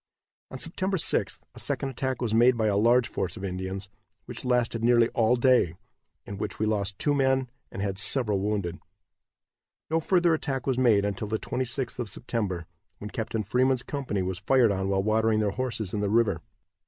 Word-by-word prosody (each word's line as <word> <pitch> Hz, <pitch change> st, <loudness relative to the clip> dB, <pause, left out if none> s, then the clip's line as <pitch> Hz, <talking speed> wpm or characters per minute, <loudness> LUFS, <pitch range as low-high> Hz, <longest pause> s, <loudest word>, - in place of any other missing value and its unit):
On 130 Hz, -, -7 dB
September 185 Hz, +6 st, -1 dB
6th -, -, 0 dB, 0.2 s
a -, -, -9 dB
second 135 Hz, -, -2 dB
attack 130 Hz, 0 st, -3 dB
was 110 Hz, -2 st, -1 dB
made 120 Hz, +2 st, +5 dB
by 110 Hz, -, +1 dB
a 105 Hz, -2 st, +2 dB
large 115 Hz, +4 st, +4 dB
force 90 Hz, +2 st, -3 dB
of 100 Hz, -, -8 dB
Indians, 95 Hz, +1 st, -4 dB, 0.4 s
which -, -, -7 dB
lasted 125 Hz, -2 st, 0 dB
nearly 120 Hz, -1 st, +4 dB
all 115 Hz, +1 st, +2 dB
day, 120 Hz, -9 st, +3 dB, 0.5 s
in 100 Hz, -1 st, -7 dB
which 105 Hz, -1 st, -4 dB
we 110 Hz, -, 0 dB
lost 100 Hz, -2 st, -1 dB
two 145 Hz, -, +1 dB
men 130 Hz, -2 st, +1 dB, 0.2 s
and 95 Hz, -, -4 dB
had 95 Hz, -2 st, -1 dB
several 105 Hz, -1 st, +3 dB
wounded. 100 Hz, -4 st, -2 dB, 1.1 s
No 165 Hz, -, +3 dB
further 175 Hz, 0 st, +3 dB
attack 135 Hz, -5 st, -2 dB
was 130 Hz, -2 st, 0 dB
made 110 Hz, -6 st, +4 dB
until 100 Hz, +1 st, -3 dB
the 110 Hz, +1 st, -1 dB
26th 125 Hz, +1 st, -3 dB
of 120 Hz, -4 st, -3 dB
September, 95 Hz, -5 st, -3 dB, 0.3 s
when 105 Hz, +1 st, -8 dB
Captain 110 Hz, -2 st, -3 dB
Freeman's 125 Hz, +4 st, +1 dB
company 130 Hz, -9 st, -3 dB
was 90 Hz, -1 st, -3 dB
fired 120 Hz, +2 st, +3 dB
on 95 Hz, 0 st, -1 dB
while 95 Hz, 0 st, +1 dB
watering 110 Hz, +1 st, +2 dB
their 105 Hz, -2 st, +1 dB
horses 115 Hz, -4 st, -3 dB
in 105 Hz, -, -1 dB
the 100 Hz, -1 st, 0 dB
river. 110 Hz, -6 st, +2 dB
110 Hz, 190 wpm, -27 LUFS, 100-130 Hz, 1.1 s, made